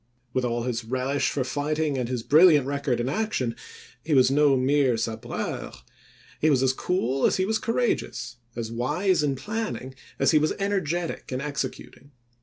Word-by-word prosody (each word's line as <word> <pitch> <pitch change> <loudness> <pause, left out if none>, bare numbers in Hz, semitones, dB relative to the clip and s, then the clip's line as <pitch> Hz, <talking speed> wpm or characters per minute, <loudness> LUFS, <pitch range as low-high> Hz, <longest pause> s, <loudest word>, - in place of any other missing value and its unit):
With 130 - 0
all 120 -1 -1
his 120 -1 -2
relish 130 +4 -1
for 135 - -1
fighting 150 +3 -1
and 125 -2 -2
his 125 -3 -2
brilliant 155 -1 +6
record 140 -3 -1
in 120 - -1
action, 140 - -1 0.5
he 155 -2 +1
was 130 0 +5
no 145 -1 +4
mere 130 -2 +2
sabreur; 115 0 -4 0.7
he 155 - +3
was 135 -3 +3
as 130 0 +3
cool 135 -4 0
as - - +1
he 185 - +1
was 220 +2 0
cour 230 - -2
ageous, 130 - -1 0.2
as 115 -1 -4
wise 155 +10 +1
in 145 -2 0
planning 210 - -4 0.2
as - - +3
he 155 - +5
was 155 +1 +1
energetic 175 -6 -2
in 130 - -2
executing. 140 -1 -5
140 Hz, 175 wpm, -25 LUFS, 125-155 Hz, 0.7 s, brilliant